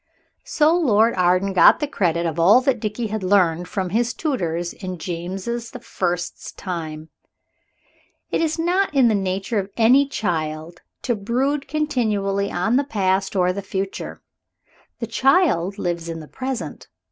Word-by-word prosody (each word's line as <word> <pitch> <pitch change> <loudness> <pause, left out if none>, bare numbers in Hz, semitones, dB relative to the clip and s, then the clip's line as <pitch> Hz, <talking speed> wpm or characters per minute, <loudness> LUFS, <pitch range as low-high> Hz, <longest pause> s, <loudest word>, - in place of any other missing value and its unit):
So 310 +2 +3
Lord 230 -9 +3
Arden 185 +2 +2
got 185 - +6
the 295 - 0
credit 170 - 0
of 165 0 -2
all 195 +9 +6
that 260 -2 +1
Dickie 215 +2 -3
had 220 - -2
learned 180 -3 +2
from 185 -3 -3
his 235 +3 0
tutors 175 - -2
in 185 -2 -6
James 175 +3 -5
the 235 0 -4
First's 175 -1 -3
time. 160 -4 -6 1.2
It - - +1
is 320 0 0
not 360 +4 +1
in 255 -4 +5
the - - +2
nature 195 +2 -1
of 195 0 -4
any 255 +5 +5
child 165 - -3 0.2
to 240 - 0
brood 265 +7 -1
continually 215 -10 0
on 185 +8 +1
the 280 - +2
past 195 -6 0
or 180 -1 +2
the 200 - -4
future. 195 0 -5 0.7
The - - -3
child 260 - +2
lives 170 -3 -3
in 165 0 -5
the 155 - -10
present. 260 - -5
200 Hz, 155 wpm, -22 LUFS, 175-245 Hz, 1.2 s, got